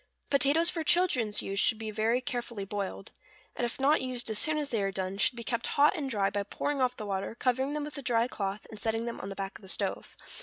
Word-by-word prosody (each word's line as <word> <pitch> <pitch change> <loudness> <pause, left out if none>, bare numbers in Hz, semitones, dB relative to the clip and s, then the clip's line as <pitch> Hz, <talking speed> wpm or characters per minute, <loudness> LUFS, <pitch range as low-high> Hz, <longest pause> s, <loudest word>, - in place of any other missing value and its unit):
= - - -44
Potatoes 285 +4 +4
for 330 - -2
children's 290 - +3
use 195 0 -2
should 220 - +3
be 220 -1 -5
very 225 +4 +1
carefully 240 -5 -3
boiled; 200 -1 -4 0.4
and 245 - 0
if 235 - -4
not 285 +3 +4
used 250 -3 -2
as 210 - +1
soon 310 0 +2
as 295 -2 -2
they 225 -3 +1
are 195 0 0
done, 190 +1 -3
should 245 - +4
be 235 - -6
kept 235 0 -2
hot 295 +5 +6
and 290 -5 -3
dry, 200 -5 +1
by 205 - -1
pouring 275 +7 -2
off 250 -1 +1
the 215 - -5
water, 195 +2 -3
covering 260 +3 0
them 300 0 -2
with 295 -1 -5
a - - -6
dry 235 -2 +2
cloth, 200 -3 -4
and 215 - -9
setting 225 +1 -1
them 235 - -5
on 195 - -5
the 195 - -6
back 195 0 -5
of - - -22
the 190 - -13
stove. - - -3
235 Hz, 265 wpm, -30 LUFS, 205-275 Hz, 0.4 s, hot